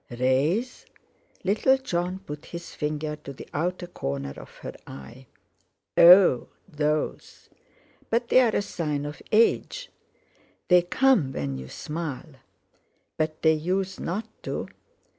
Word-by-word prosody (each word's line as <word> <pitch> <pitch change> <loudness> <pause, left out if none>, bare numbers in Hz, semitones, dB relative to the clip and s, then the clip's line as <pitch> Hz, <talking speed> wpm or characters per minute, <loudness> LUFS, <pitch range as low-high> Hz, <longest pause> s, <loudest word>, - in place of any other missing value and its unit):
"Rays?" 135 - 0 0.6
Little 220 +7 +3
Jon 185 -6 -2
put 150 0 -7
his 170 0 -8
finger 150 0 -3
to 145 -2 -9
the - - -11
outer 175 +4 -2
corner 70 - -4
of - - -11 0.2
her - - -5
eye. 115 - -11 0.7
"Oh! 175 -6 +8 0.2
Those? 150 -3 -3 0.6
But 235 +1 0
they're 250 -4 +5
a - - +1
sign 150 -7 -3
of 145 -1 -7
age." 230 - +2 0.8
"They 180 -1 +7
come 175 - +2
when 70 - -3
you 65 0 -9
smile." 155 -2 -5 0.8
"But 155 0 -2
they 160 -1 +6
usen't 185 +4 -2 0.2
to." - - -4
160 Hz, 120 wpm, -26 LUFS, 145-190 Hz, 0.8 s, Oh